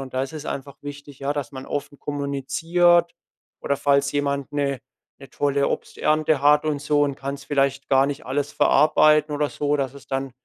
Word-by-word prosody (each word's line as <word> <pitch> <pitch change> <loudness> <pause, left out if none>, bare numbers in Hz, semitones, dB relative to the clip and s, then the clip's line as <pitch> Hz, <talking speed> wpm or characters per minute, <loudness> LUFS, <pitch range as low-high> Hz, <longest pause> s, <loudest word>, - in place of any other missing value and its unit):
Und 135 -1 -8
da 130 - 0
ist 135 - -5
es 155 -1 -7
einfach 140 0 -6
wichtig, 145 -1 -9
ja, 140 +1 -1
dass 145 -1 -4
man 130 -1 -9
offen 145 0 -5
kommuniziert 165 +5 +1 0.5
oder 140 - -1
falls 140 0 +2
jemand 140 0 -2
'ne 140 -2 -1 0.4
'ne 135 -2 -13
tolle 140 -1 0
Obsternte 155 -1 0
hat 150 +1 +4
und 150 -2 -1
so 145 0 +2
und 140 -1 0
kann's 140 +1 -5
vielleicht 135 -1 0
gar 135 0 +4
nicht 145 +1 -5
alles 140 +2 -2
verarbeiten 150 +1 +4
oder 145 0 0
so, 145 0 0
dass 135 -1 -2
es 140 - -13
dann 135 0 -3
140 Hz, 190 wpm, -23 LUFS, 140-150 Hz, 0.5 s, hat